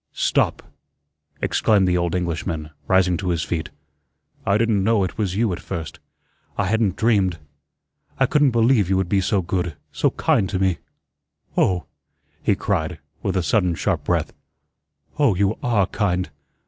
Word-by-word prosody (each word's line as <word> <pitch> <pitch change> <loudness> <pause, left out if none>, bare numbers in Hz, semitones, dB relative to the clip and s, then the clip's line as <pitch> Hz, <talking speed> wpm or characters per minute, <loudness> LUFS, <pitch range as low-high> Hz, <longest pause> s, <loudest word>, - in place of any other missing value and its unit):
"Stop," - - +1 0.8
exclaimed 100 -4 +3
the 90 - +2
old 85 0 0
Englishman, 85 -3 -3 0.2
rising 90 -2 +3
to 95 0 -3
his 85 -3 0
feet. 80 +1 -3 0.8
"I 100 +1 +4
didn't 110 -3 +2
know 110 -1 +3
it 95 - -3
was 100 -4 -1
you 110 -2 +1
at - - -5
first. 80 -4 -6 0.6
I 100 - +1
hadn't 105 -1 +1
dreamed 100 -6 +2 0.8
I - - +5
couldn't 145 -2 +3
believe 115 -4 +3
you 95 - +2
would 95 -1 0
be 100 +1 +2
so 95 0 +1
good, 90 -2 -2 0.2
so - - +1
kind 95 - +1
to - - -1
me. 95 -2 +1 0.8
Oh," 90 -3 +2 0.6
he - - +2
cried, - - -1 0.2
with 95 -1 -1
a 90 - +1
sudden 90 +2 +2
sharp - - -1
breath, - - -1 0.9
"oh, 135 -9 +4
you 100 +3 +1
ARE 110 -6 +2
kind. 90 -3 -1
95 Hz, 160 wpm, -22 LUFS, 90-105 Hz, 0.9 s, I